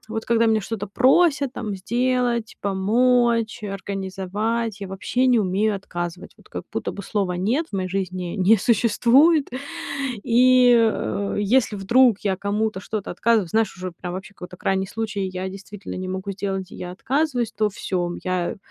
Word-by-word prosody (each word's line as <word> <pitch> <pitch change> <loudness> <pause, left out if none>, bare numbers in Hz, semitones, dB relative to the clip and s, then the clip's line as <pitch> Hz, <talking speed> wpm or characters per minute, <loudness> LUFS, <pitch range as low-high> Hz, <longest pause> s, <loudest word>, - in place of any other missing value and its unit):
вот 225 0 -4
когда 230 -1 +3
меня 220 -1 +3
что-то 205 0 -4
просят, 275 - +3
там, 215 -6 -4
сделать, 240 +2 0
помочь, 230 +3 +2
организовать, 200 +3 -3
я 195 - -5
вообще 245 +7 0
не 245 -2 +4
умею 205 +2 +1
отказывать. 175 -2 -6
Вот - - -21
как - - -6
будто - - -2
бы 200 - -7
слова 195 -2 -1
"нет" 235 - 0
в 200 - -3
моей 185 -1 -2
жизни 185 -2 -3
не 200 +3 +5
существует. 245 - +4 0.8
И, 250 +1 +5
э, 210 -3 0
если 220 +1 +2
вдруг 230 +2 +4
я 195 -2 0
кому-то 205 +1 -1
что-то 210 0 -5
отказываю, 215 0 +1
знаешь, 220 -1 0
уже 185 -1 -6
прям 175 +1 -7
вообще 190 +2 -8
какой-то 180 0 -10
крайний 190 +1 0
случай, 215 0 -4
и 185 - -5
я 185 0 -4
действительно 200 +1 -9
не 185 0 -4
могу 190 +2 -4
сделать, 195 -1 -4
и - - -9
я 180 - -6
отказываюсь, 250 - -1
то 215 0 +1
всё, 185 -2 -2
м, 175 - -5
я 185 +1 -1
205 Hz, 170 wpm, -23 LUFS, 190-235 Hz, 0.8 s, не